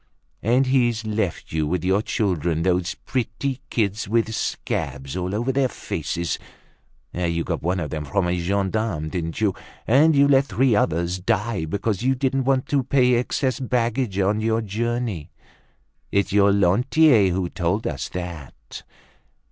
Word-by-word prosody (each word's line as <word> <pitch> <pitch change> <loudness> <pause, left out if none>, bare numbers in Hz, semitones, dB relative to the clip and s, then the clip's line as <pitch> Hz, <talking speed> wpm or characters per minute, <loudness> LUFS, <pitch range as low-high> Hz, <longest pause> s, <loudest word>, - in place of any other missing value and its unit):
And 125 +5 +3
he's 120 -4 +1
left 105 -5 -2
you 80 -1 0
with 90 +1 -1
your 95 +3 +2
children. 85 -7 -1
Those 90 -1 0
pretty 130 +2 -3
kids 105 -3 -1
with 115 0 +1
scabs 70 -8 -3
all 95 +2 -2
over 120 +5 0
their 135 0 +2
faces! 85 -7 -3 0.7
You 85 -1 -1
got - - -3
one 90 +3 0
of 75 -4 -4
them 75 -1 -4
from 95 +2 0
a 90 - +1
gendarme, 95 -2 -1
didn't 85 0 -4
you? 105 -3 +2 0.3
And 145 +7 +5
you 140 0 +5
let 135 -1 +4
three 130 -3 +2
others 85 -1 0
die 95 0 -1
because 100 +4 -2
you 130 +2 +2
didn't 135 0 0
want 130 -1 +2
to 140 -2 +2
pay 125 -1 +3
excess 125 +2 0
baggage 120 -4 -1
on 100 +2 +1
your 110 +1 +1
journey. 110 -5 -2 0.8
It's 100 -1 +1
your 100 0 +5
Lantier 105 - +4
who 90 0 -1
told 90 +6 -1
us - - -3
that. 85 -6 -8
105 Hz, 155 wpm, -23 LUFS, 90-125 Hz, 0.8 s, And